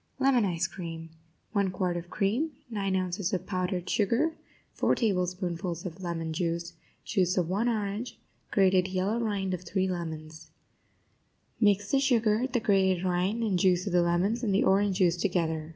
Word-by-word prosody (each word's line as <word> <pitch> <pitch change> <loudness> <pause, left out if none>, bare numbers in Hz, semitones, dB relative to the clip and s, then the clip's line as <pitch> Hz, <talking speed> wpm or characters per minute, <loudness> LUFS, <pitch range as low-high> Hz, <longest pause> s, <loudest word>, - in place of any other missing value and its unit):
LEMON 260 -5 +3
ICE 170 -3 0
CREAM 165 -3 -7 0.4
1 200 -3 +1
quart 180 -1 -1
of 175 0 -5
cream 230 - 0 0.2
9 195 -3 -1
ounces 185 +1 -1
of 185 - -1
powdered 185 -1 -2
sugar 235 +10 +1 0.4
4 - - +2
tablespoonfuls 180 -4 -1
of 180 +1 -7
lemon 165 -2 -3
juice 170 0 -2 0.3
Juice 185 -3 +1
of 175 -3 +2
one 205 +7 +1
orange 215 +1 -3 0.3
Grated 190 -2 +3
yellow 190 +4 -1
rind 200 -4 -1
of 180 - -3
3 190 +1 -1
lemons 160 -3 -6 1.1
Mix 205 -2 +2
the 275 - +4
sugar, 235 -3 +2
the 245 - +1
grated 190 -4 +2
rind 185 +5 0
and 195 -5 +1
juice 180 0 +3
of 200 - -3
the 175 - +5
lemons, 180 +7 +1
and 205 -5 +1
the - - +3
orange 195 0 +3
juice 180 -3 +3
together. 165 -4 -1
185 Hz, 165 wpm, -28 LUFS, 175-205 Hz, 1.1 s, the